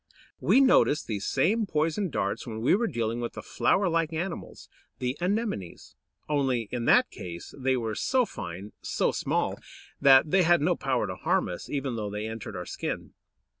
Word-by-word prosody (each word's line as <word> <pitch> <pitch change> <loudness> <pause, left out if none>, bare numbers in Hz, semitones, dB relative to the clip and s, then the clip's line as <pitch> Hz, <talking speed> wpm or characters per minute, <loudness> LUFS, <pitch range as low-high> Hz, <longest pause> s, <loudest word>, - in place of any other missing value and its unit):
We 270 - +4
noticed 255 - +4
these 105 -3 -3
same 205 +11 +2
poison 165 +4 0
darts 100 -4 -2
when 110 -1 -5
we 120 - +3
were 230 +4 +2
dealing 115 - -2
with 120 - -4
the - - -8
flower 195 0 +1
like 165 -2 +1
animals, 170 +3 -5 0.3
the 125 +1 -2
Anemones. 190 - -3 0.3
Only, 135 -5 +1
in 120 -2 -2
that - - +5
case, 85 -1 -8
they 130 -1 +1
were 115 -3 -2
so 255 - +1
fine, 95 - -7
so - - 0
small, - - -1 0.4
that 140 +2 +6
they 190 - +5
had 175 0 +5
no 175 +4 +2
power 130 -5 0
to - - -5
harm - - +1
us, 90 - -7
even 135 -4 -2
though 105 -2 -3
they 105 +1 -4
entered 110 -2 -6
our 90 0 -5
skin. - - -5
135 Hz, 180 wpm, -27 LUFS, 110-175 Hz, 0.4 s, that